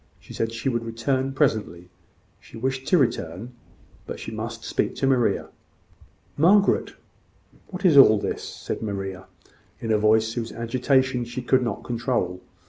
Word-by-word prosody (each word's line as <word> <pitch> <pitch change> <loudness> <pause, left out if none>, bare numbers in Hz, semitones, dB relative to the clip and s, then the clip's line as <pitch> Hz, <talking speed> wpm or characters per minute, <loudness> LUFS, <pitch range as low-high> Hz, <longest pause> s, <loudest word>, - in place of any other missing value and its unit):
She - - -13
said 115 0 -2
she 115 +4 -4
would 120 -3 0
return 130 +4 -1
presently: 105 - -1 0.5
she - - -13
wished 130 +2 -3
to 180 - +4
return: 115 - -1 0.5
but - - -6
she - - -7
must 115 +1 -6
speak - - -1
to - - -1
Maria. 130 -3 +1 0.9
"Margaret, 195 +6 +4 0.7
what 190 0 -6
is 160 -6 +6
all 110 -6 +8
this?" - - -3
said - - -6
Maria, 95 -3 -5 0.5
in 115 - -3
a 105 - +3
voice 110 +1 +3
whose 115 -1 -4
agitation 125 +2 +1
she 120 +2 -6
could 130 - +3
not 115 -4 -3
control. 120 -7 -2
115 Hz, 150 wpm, -24 LUFS, 110-130 Hz, 0.9 s, all